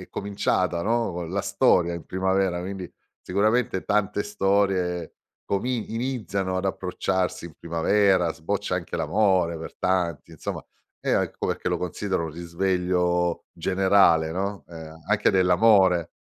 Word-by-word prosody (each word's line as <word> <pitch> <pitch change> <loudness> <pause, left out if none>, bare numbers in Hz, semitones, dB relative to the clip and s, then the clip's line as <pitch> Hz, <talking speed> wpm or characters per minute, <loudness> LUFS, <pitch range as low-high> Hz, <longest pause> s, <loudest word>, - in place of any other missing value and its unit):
è - - -13
cominciata, 95 -3 -1
no, 115 +3 +1
co 90 - -4
la 95 +5 -2
storia 85 -1 +2
in 85 - -7
primavera 95 -1 0
quindi 95 0 -6 0.3
sicuramente 105 +1 0
tante 105 0 0
storie 95 -3 0 0.3
comin 115 +3 -1
iniziano 110 -6 -2
ad 95 - -4
approcciarsi 95 -1 -2
in 80 - -13
primavera, 90 +1 +2
sboccia 90 +4 -2
anche 90 - -5
l'amore 90 -2 +1
per 80 - -8
tanti, 90 -4 -1
insomma, 80 - -6 0.4
e - - -1
a - - +3
ecco - - -4
perché - - -2
lo - - -1
considero 90 0 -2
un - - -6
risveglio 90 0 0
generale, 95 -4 +3
no, 100 +3 -3
ehm, 80 -2 -9
a 80 - -12 0.2
anche 105 - +3
dell'amore. 95 -2 +4
95 Hz, 140 wpm, -25 LUFS, 85-100 Hz, 0.4 s, dell'amore